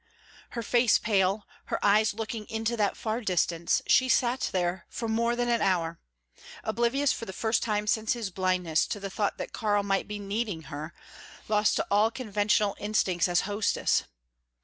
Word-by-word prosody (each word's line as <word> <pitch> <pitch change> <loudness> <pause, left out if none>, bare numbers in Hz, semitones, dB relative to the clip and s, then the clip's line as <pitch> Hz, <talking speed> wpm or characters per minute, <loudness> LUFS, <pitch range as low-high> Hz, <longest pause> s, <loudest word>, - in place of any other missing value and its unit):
Her 235 - -2
face 240 0 +4
pale, 200 -1 +1 0.2
her - - -2
eyes 210 +1 +4
looking 225 -1 -5
into 225 0 -2
that 210 -3 0
far 220 +2 -2
distance, 170 -4 +1
she 255 0 +4
sat 250 0 +2
there 180 0 -1
for 230 - -4
more 235 +2 +1
than 245 0 -1
an 235 -1 +1
hour, 170 -3 0 0.6
oblivious 240 +5 +1
for 230 - -6
the 190 - -6
first 220 +3 0
time 210 -2 -1
since 220 +2 +1
his 230 -5 -4
blindness 180 -3 +1
to 205 - -4
the 195 -1 -6
thought 205 +1 -1
that - - -6
Karl 205 -2 +1
might 195 -1 0
be 210 - -5
needing 205 -3 -3
her, 155 +3 -6 0.5
lost 210 0 +2
to - - 0
all 210 +2 +4
conventional 210 -3 0
instincts 195 -4 +1
as 175 -1 +2
hostess. 205 +1 0
210 Hz, 170 wpm, -28 LUFS, 190-230 Hz, 0.6 s, face